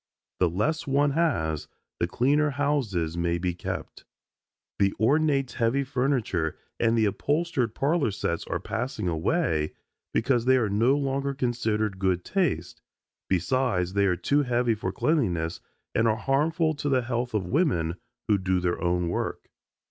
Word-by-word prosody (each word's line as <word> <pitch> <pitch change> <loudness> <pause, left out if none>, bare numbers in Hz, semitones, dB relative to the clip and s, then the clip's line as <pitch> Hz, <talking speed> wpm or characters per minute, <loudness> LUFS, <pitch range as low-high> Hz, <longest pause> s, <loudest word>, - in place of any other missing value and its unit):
The 90 - +3
less 145 - -1
one 140 +1 +3
has, 110 - 0 0.3
the 85 - +1
cleaner 145 +10 +2
houses 130 - -1
may 85 0 0
be 90 0 -1
kept. 85 - -6 0.8
The 100 -1 +2
ornate 140 +1 +2
heavy 120 +5 +1
furniture 125 - -1 0.2
and 115 0 +2
the 110 - +4
upholstered 145 - 0
parlor 145 -2 +1
sets 85 -4 -2
are - - -2
passing 110 -3 -3
away 80 - 0 0.4
because 120 0 +1
they 130 0 +5
are 110 -4 +1
no 115 +8 +3
longer 140 0 -1
considered 110 -6 -1
good 95 -2 0
taste, 165 - -1 0.5
besides 95 -2 +1
they 100 0 +3
are 90 - +2
too 140 +12 +1
heavy 120 -3 +1
for 105 -3 -3
cleanliness 90 - 0 0.3
and 115 - +2
are 110 - +3
harmful 155 +6 +1
to 145 0 -2
the 130 -2 +2
health 120 -1 -2
of 100 -4 0
women 90 - +1 0.3
who 105 -3 +3
do 95 0 +1
their 90 0 -1
own 90 0 +1
work. 85 - -3
115 Hz, 150 wpm, -26 LUFS, 90-140 Hz, 0.8 s, they